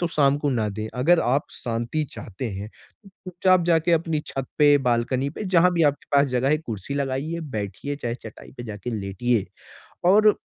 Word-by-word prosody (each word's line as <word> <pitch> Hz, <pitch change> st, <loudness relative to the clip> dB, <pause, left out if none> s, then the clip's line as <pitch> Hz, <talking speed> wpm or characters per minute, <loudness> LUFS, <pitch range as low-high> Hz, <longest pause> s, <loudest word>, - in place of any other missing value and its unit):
तो 175 Hz, -, +1 dB
शाम 145 Hz, -3 st, +3 dB
को 145 Hz, -1 st, 0 dB
ना 110 Hz, -5 st, 0 dB
दें। 110 Hz, +2 st, -4 dB
अगर 165 Hz, +7 st, +4 dB
आप 135 Hz, +4 st, +1 dB
शांति 120 Hz, +6 st, -2 dB
चाहते 110 Hz, +5 st, -6 dB
हैं, 100 Hz, +2 st, -6 dB
तो 195 Hz, -, -22 dB
चुपचाप 185 Hz, -1 st, +1 dB
जाके 170 Hz, 0 st, +3 dB
अपनी 160 Hz, -2 st, +1 dB
छत 135 Hz, -1 st, -4 dB
पे, 145 Hz, -1 st, +6 dB
बालकनी 125 Hz, +2 st, 0 dB
पे, 210 Hz, -, -6 dB
जहाँ 180 Hz, -1 st, +4 dB
भी 170 Hz, -1 st, +2 dB
आपके 145 Hz, -, -15 dB
पास 140 Hz, -, +5 dB
जगह 125 Hz, 0 st, 0 dB
है, 155 Hz, +1 st, +3 dB
कुर्सी 120 Hz, -, -6 dB
लगाइए, 140 Hz, +4 st, -2 dB, 0.2 s
बैठिए, 105 Hz, +8 st, -4 dB
चाहे 120 Hz, -4 st, -3 dB
चटाई 115 Hz, -3 st, -12 dB
पे 120 Hz, -, -6 dB
जाके 105 Hz, +1 st, -6 dB
लेटिए। 100 Hz, +3 st, 0 dB, 0.7 s
और 210 Hz, +2 st, +6 dB
140 Hz, 190 wpm, -24 LUFS, 120-165 Hz, 0.7 s, पे